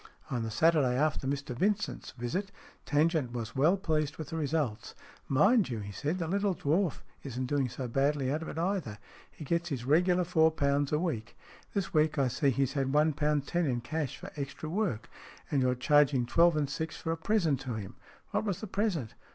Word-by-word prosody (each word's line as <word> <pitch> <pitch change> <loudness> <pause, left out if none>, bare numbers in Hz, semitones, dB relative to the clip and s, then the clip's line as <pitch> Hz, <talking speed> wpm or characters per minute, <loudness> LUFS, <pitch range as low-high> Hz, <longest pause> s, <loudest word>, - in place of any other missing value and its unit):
On 125 -3 -1
the 115 - -3
Saturday 135 +1 +3
after 145 -2 0
Mr 140 -2 -3
Vincent's 205 - -1
visit, 135 +12 -3 0.4
Tangent 150 -4 +2
was 120 -1 -5
well 155 +8 +4
pleased 155 -6 -1
with 155 -3 -6
the - - -5
results. 150 -7 -2 0.3
"Mind 200 - +4
you," 120 - -3
he 100 -1 -6
said, 150 - -2
"the 170 -3 -2
little 200 +1 +1
dwarf 165 +3 0 0.2
isn't 130 -2 -4
doing 135 -1 0
so 125 +1 -5
badly 135 +2 +1
out 155 +3 -1
of 165 - -6
it - - -6
either. 170 - -1 0.3
He 155 - -10
gets 170 +3 0
his 130 -5 -3
regular 175 +5 +3
four 160 -2 +4
pounds 140 -2 0
a 150 - +3
week. 150 -10 -3 0.4
This 200 -3 -1
week 155 0 +2
I 135 -2 +2
see 140 +3 +1
he's 135 +1 0
had 135 -2 0
one 150 +2 +3
pound 150 -1 0
ten 175 0 0
in 120 -3 0
cash 150 +2 -3
for - - -9
extra 140 +2 -5
work, 165 - -1 0.4
and 140 -3 +2
you're 125 0 +2
charging 135 -1 +3
twelve 170 +5 +4
and 145 -2 +1
six 155 +2 -4
for 165 +4 -3
a - - 0
present 165 - +1
to 130 -3 -4
him. 100 -3 -7 0.4
What - - +1
was 200 -4 -1
the - - -5
present 190 - -1
150 Hz, 205 wpm, -30 LUFS, 130-165 Hz, 0.4 s, well